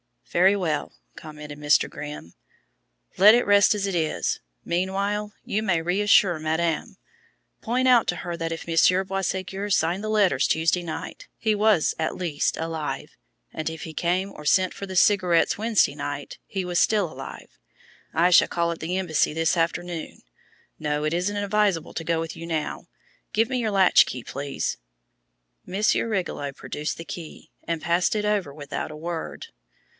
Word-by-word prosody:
"Very 190 +3 +5
well," 165 -6 -2 0.2
commented 150 -2 -9
Mr. 150 0 +3
Grimm. 150 - -8 0.8
"Let 210 +4 +8
it 245 - +2
rest 205 +1 +5
as 200 -1 -1
it 195 - -2
is. 160 -3 -1 0.2
Meanwhile 200 +4 -1
you 215 - -1
may 185 -6 +1
reassure 180 -1 +3
madame. 160 +1 -1 0.7
Point 250 +3 0
out 245 -3 +5
to - - 0
her 175 -1 -5
that 165 -1 -3
if 165 - -7
Monsieur 175 +3 +3
Boisségur 195 +1 -3
signed 175 +2 +1
the 215 - -3
letters 200 -11 +3
Tuesday 165 +2 +1
night 165 -2 -7
he 220 -1 +1
was, 210 -5 +3
at 160 - -1
least, 165 -5 -1
alive; 160 -2 -4 0.4
and 155 0 -3
if 160 -1 -7
he 160 - -7
came 180 +4 0
or 150 - -11
sent 185 +4 +3
for 200 - -6
the 190 -1 -7
cigarettes 180 -3 +3
Wednesday 215 -9 +2
night, 145 -1 -5
he 190 -1 -3
was 180 -1 0
still 205 -7 +2
alive. 135 -2 -10 0.5
I 170 +2 +4
shall - - +7
call 170 -1 0
at 170 - -6
the 175 +3 -2
embassy 160 -6 +1
this 165 +2 +1
afternoon. 170 0 -2 0.6
No, 150 -1 -1
it 155 +1 0
isn't 180 +4 -1
advisable 205 -4 0
to 165 - -5
go 165 0 0
with 165 0 -6
you 165 - -7
now. 160 -2 -3 0.5
Give 225 +2 +2
me 255 -1 -1
your 220 -3 -1
latch 190 -2 +6
key, 125 -2 -6
please." 140 +3 -3 0.9
Monsieur 200 +5 +1
Rigolot 175 -9 -3
produced 150 +1 -4
the 165 - -8
key 165 -2 -9
and 165 -2 -2
passed 170 +4 +1
it 210 -1 -1
over 205 -9 0
without 145 -1 -5
a - - -8
word. 165 +1 -5
175 Hz, 170 wpm, -25 LUFS, 160-200 Hz, 0.9 s, Let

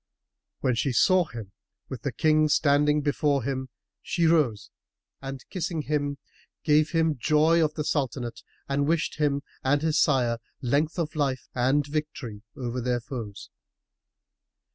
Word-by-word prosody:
When 130 - +2
she 125 +3 0
saw 185 +8 +4
him, 115 -8 -9 0.4
with 130 -4 -7
the 140 - -2
King 155 +1 +3
standing 150 0 +3
before 145 -2 +1
him, 130 0 -3 0.3
she 170 - 0
rose 150 -10 +2 0.5
and 135 -1 -7
kissing 170 -3 -2
him, 145 -1 -1 0.5
gave 150 0 +4
him 160 -4 +1
joy 155 +5 +4
of 150 -1 -1
the 150 - -2
Sultanate 130 -5 -2 0.3
and 140 +1 0
wished 165 -1 0
him 145 -2 +1 0.2
and 145 +3 +2
his 160 -2 +2
sire 120 -5 +2 0.2
length 145 +6 0
of 160 -2 -2
life 140 -4 -1
and 135 +4 +2
victory 145 -7 -4 0.2
over 125 -1 -3
their 125 0 0
foes. 115 -4 -7
145 Hz, 140 wpm, -26 LUFS, 130-155 Hz, 0.5 s, saw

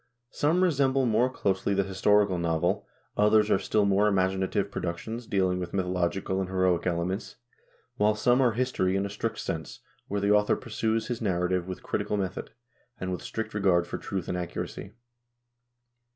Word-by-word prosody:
Some 165 +5 +2
resemble 135 -6 +2
more 120 +2 +3
closely 100 -5 0
the 100 - +2
historical 100 0 +2
novel, 85 0 0 0.3
others 105 0 +4
are 95 - +4
still 105 +1 +1
more 100 +1 +3
imaginative 95 0 0
productions, 110 +8 -4
dealing 95 -2 +1
with 90 -1 -5
mythologi 90 -1 -1
cal 95 0 -1
and 95 - -3
heroic 95 -2 +1
elements, 90 +4 -2 0.6
while 105 +1 +3
some 125 +4 +3
are 120 -4 +3
history 110 -6 0
in 95 +1 0
a 100 - -5
strict 110 +2 -3
sense, 80 -2 -5 0.3
where 100 - -1
the 100 +1 +1
author 105 0 +4
pursues 110 -1 -1
his 120 -1 -4
narrative 90 -3 0
with 95 - -6
critical 105 - -1
method, 95 -2 -3 0.5
and 95 0 -3
with 90 - -3
strict 110 - -5
regard 95 -4 +2
for - - -5
truth 95 -3 -4
and 90 - -2
accuracy. 90 - -5
100 Hz, 165 wpm, -28 LUFS, 90-110 Hz, 0.6 s, others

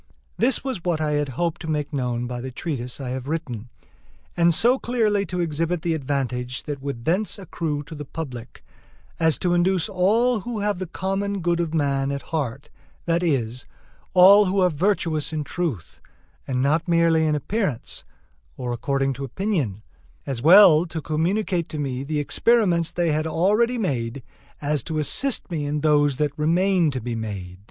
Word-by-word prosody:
This 255 +3 +1
was 255 -10 -4
what 175 -3 0
I 155 -1 0
had 145 -1 0
hoped 170 -1 -1
to 160 - -5
make 150 -1 -2
known 125 -3 -1
by 125 0 -5
the 130 - -5
treatise 130 -2 -5
I 135 -2 -5
had 130 +1 -4
written, 130 -8 -4 0.7
and 170 0 +4
so 240 +10 +4
clearly 215 -5 +1
to 180 0 -2
exhibit 165 +1 -1
the 170 - +1
advantage 130 -4 -2
that 145 -2 -5
would 135 -4 -5
thence 195 +7 0
accrue 160 -6 -3
to 150 - -11
the 150 -1 -6
public, 130 -5 -8 0.5
as 160 -2 +3
to 180 -2 0
induce 175 0 +2
all 220 +6 +2
who 235 +3 -5
have 205 -3 -1
the 185 - -4
common 195 +3 -2
good 170 0 +1
of 165 -2 -1
man 140 -2 +1
at 140 0 -4
heart, 140 -4 -3 0.3
that 170 0 +1
is, 130 -7 -1 0.5
all 195 +3 +8
who 195 +1 0
are 180 -1 +4
virtuous 160 -2 0
in 155 -1 -2
truth, 130 - -4 0.5
and 130 -1 0
not 155 +5 +1
merely 165 -2 +3
in 150 - +2
appearance, 180 - -3 0.5
or 125 -1 -3
according 135 +2 0
to 135 +2 -7
opinion, 135 - -2 0.4
as 130 -4 -3
well 175 +1 +7
to 160 0 -5
communicate 170 +4 -1
to 155 - -6
me 135 -3 -3
the 150 +2 -3
experiments 175 0 +2
they 170 -2 0
had 155 +1 0
already 210 +10 +2
made, 130 - -2 0.4
as 145 -3 0
to 160 -1 -3
assist 220 - 0
me 150 -4 -2
in 150 +1 -2
those 145 -3 +3
that 150 -1 +1
remain 175 +2 +2
to 130 -2 -3
be 120 0 -4
made. 95 -5 -6
155 Hz, 180 wpm, -23 LUFS, 135-180 Hz, 0.7 s, all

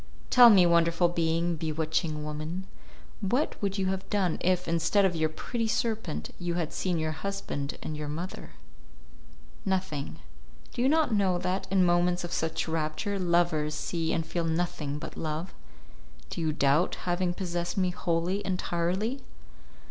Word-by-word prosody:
"Tell 245 -1 +10
me, 190 -5 +7
wonderful 170 0 +4
being, 170 0 +1
bewitching 155 0 -1
woman, 155 +5 -4 0.5
what 240 +9 0
would 200 0 -1
you 195 - 0
have 190 0 -5
done 190 -5 +1
if, 180 0 +1
instead 170 +5 +3
of 180 -2 +1
your 160 -1 +1
pretty 230 +8 -3
serpent, 220 -7 -2
you 175 -1 -2
had 170 -3 -2
seen 180 -2 -1
your 155 0 -1
husband 155 -4 -4
and 155 - -4
your 150 0 -4
mother?" 165 +5 -6 1.1
"Nothing. 185 -7 -2 0.6
Do - - -2
you 260 - +4
not 310 -5 +3
know 195 -4 +2
that, 185 +2 -2
in 190 -1 +4
moments 175 0 +2
of 175 - -5
such 160 +1 -1
rapture, 160 +6 -2
lovers 170 -4 +2
see 165 0 -2
and 165 - 0
feel 170 +1 -2
nothing 160 -3 -1
but - - -7
love? 160 +3 -3 0.8
Do - - -3
you 160 -1 +1
doubt 150 +3 +2
having 175 0 0
possessed 175 -2 -3
me 185 -2 +2
wholly, 175 +3 -1
entirely?" 185 +6 -1
175 Hz, 155 wpm, -29 LUFS, 160-190 Hz, 1.1 s, Tell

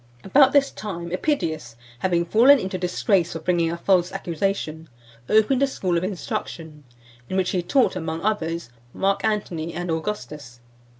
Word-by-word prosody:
IV. - - -19
About 275 -1 +6
this 280 -1 +3
time, 185 -4 -6
EPIDIUS 165 - -2 0.2
having 170 0 +1
fallen 240 +10 +6
into 190 -5 -4
disgrace 180 0 +1
for 165 - -5
bringing 170 0 +1
a 170 - -3
false 180 0 +2
accusation, 165 -2 -3 0.4
opened 220 +5 +3
a 275 - +4
school 185 -9 -2
of 170 - 0
instruction, 160 -5 -5 0.4
in 190 - -2
which 185 -1 +1
he 180 - 0
taught, 255 +5 +2
among 160 -2 -3
others, 170 - -2 0.2
Mark 195 +1 0
Antony 175 -7 -2
and 175 0 -3
Augustus. 150 - -5
180 Hz, 160 wpm, -23 LUFS, 165-210 Hz, 0.4 s, About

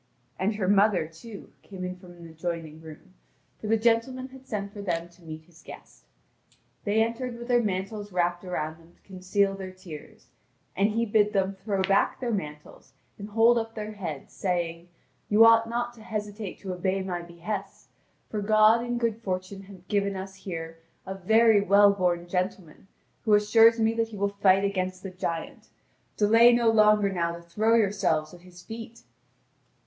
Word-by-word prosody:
And 205 +3 0
her 200 -3 -2
mother, 200 -3 +3
too, 200 +7 -12
came 190 -2 -9
in 180 0 -4
from 180 -1 -14
an 170 -1 -13
adjoining 160 -1 -6
room, 160 +4 -13 0.5
for 215 - -6
the 225 +1 +3
gentleman 240 +3 0
had 265 0 -15
sent 200 -2 -4
for 205 - -7
them 170 -3 -3
to 175 +1 -23
meet 160 -1 -9
his 165 0 -21
guest. - - -14 0.8
They 215 +2 +3
entered 235 +1 -4
with 240 0 -8
their 245 -1 +3
mantles 205 0 -3
wrapped 175 0 0
about 160 -3 -4
them 165 +1 -21
to - - -34
conceal 195 +1 -1
their 190 -1 -7
tears; 180 -5 -12 0.5
and 200 +2 +2
he 230 +2 0
bid 210 -1 +2
them 195 -1 +1
throw 195 0 -2
back 195 +1 +2
their 245 -2 -2
mantles, 150 -7 -7 0.3
and 205 +1 -7
hold 230 +2 +4
up 225 0 -6
their 215 -1 -5
heads, 170 -9 -7
saying: 175 -2 -3 0.4
"You 215 +2 +7
ought 230 0 +5
not 240 +1 -2
to 230 - -16
hesitate 210 -2 -5
to 190 -2 -4
obey 190 +2 -1
my 180 -2 -3
behests, 180 +4 -7 0.4
for 210 - -4
God 215 +2 +5
and 240 0 -2
good 230 -1 -1
fortune 185 -1 -4
have 190 -2 -15
given 200 -1 0
us 190 0 -6
here 165 -4 -7 0.3
a 190 - -5
very 220 +3 +4
well 200 0 +6
born 175 -3 0
gentleman 180 -1 -4 0.4
who 215 -2 +4
assures 225 +2 +5
me 225 0 +2
that 230 0 0
he 220 -2 -10
will 200 +1 0
fight 200 -1 +3
against 185 -2 -2
the 195 - -6
giant. 170 -2 -5 0.5
Delay 225 +3 +6
no 235 -1 +3
longer 210 -2 +4
now 170 -2 -1
to 170 - -10
throw 215 +7 +1
yourselves 195 -8 +1
at 175 - -13
his 180 -1 -15
feet!" 225 +1 -9
200 Hz, 180 wpm, -27 LUFS, 180-220 Hz, 0.8 s, You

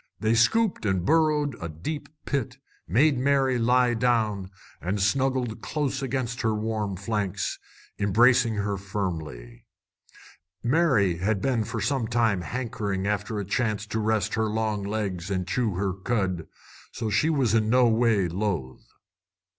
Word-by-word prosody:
They 110 +1 +2
scooped 210 - +2
and 95 -4 0
burrowed 150 -2 +2
a 85 - -4
deep 90 - -5 0.2
pit, 140 -6 -2 0.3
made 130 - +3
Mary 135 -2 +2
lie 125 +1 +3
down, 110 -5 0 0.3
and 95 +4 -2
snuggled 130 +2 0
close 140 -3 -2
against 130 -2 -2
her 110 -2 +1
warm 105 -2 -2
flanks, 100 -1 -2 0.4
embracing 115 +3 +4
her 100 -1 -1
firmly. 80 -12 -5 1.0
Mary 120 - +3
had 100 +3 0
been 120 +1 0
for 115 +1 -4
some 135 -4 0
time 115 -5 +1
hankering 100 -1 -3
after 105 +1 -1
a 100 - -3
chance 105 0 -1
to 110 +1 -3
rest 110 -1 0
her 110 0 +1
long 110 -1 -1
legs 100 -3 -3
and 95 -2 -2
chew 115 -2 0
her 95 0 -1
cud, 95 -4 -2 0.4
so 110 -2 -3
she 155 +10 +2
was 135 -9 +2
in 110 -1 +2
no 125 +1 +5
way 110 -4 +3
loath. 85 - -3
110 Hz, 145 wpm, -26 LUFS, 100-125 Hz, 1.0 s, no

